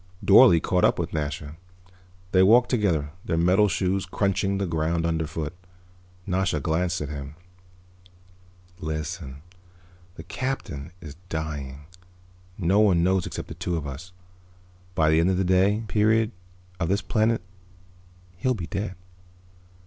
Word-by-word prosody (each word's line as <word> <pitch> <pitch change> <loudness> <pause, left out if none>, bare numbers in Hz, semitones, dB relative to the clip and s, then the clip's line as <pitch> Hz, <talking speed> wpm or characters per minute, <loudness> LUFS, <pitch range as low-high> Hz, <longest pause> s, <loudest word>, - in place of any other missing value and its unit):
Dorle 100 -3 +8
caught 90 +2 0
up - - +4
with 85 -1 -3
Nasha. 75 0 -4 0.7
They 95 - +5
walked 120 +6 +5
together, 85 - +1
their 80 - -1
metal 90 +5 +4
shoes 95 -1 -1
crunching 100 +1 0
the 100 - -1
ground 80 0 -1
underfoot. 80 -1 -2 0.7
Nasha 90 -4 0
glanced 85 +3 -1
at 75 - -4
him. 70 0 -7 1.4
"Listen. 80 -2 -5 0.7
The 80 - -9
Captain 90 - -4
is 75 -2 -10
dying. 75 -3 -5 0.7
No 95 +2 +2
one 95 -6 +4
knows 95 -1 +1
except - - -6
the - - -7
two 85 -1 -3
of 75 - -4
us. 70 +6 -8 0.8
By 80 -1 +3
the 80 - +4
end 85 +3 +3
of 95 - +1
the 95 - +1
day 95 +4 +2
period 110 +1 +2 0.5
of 85 -1 -1
this 100 0 +1
planet 110 -1 +1 0.9
he'll 130 +6 0
be 90 -6 -5
dead. 95 +2 -4
90 Hz, 135 wpm, -25 LUFS, 80-100 Hz, 1.4 s, Dorle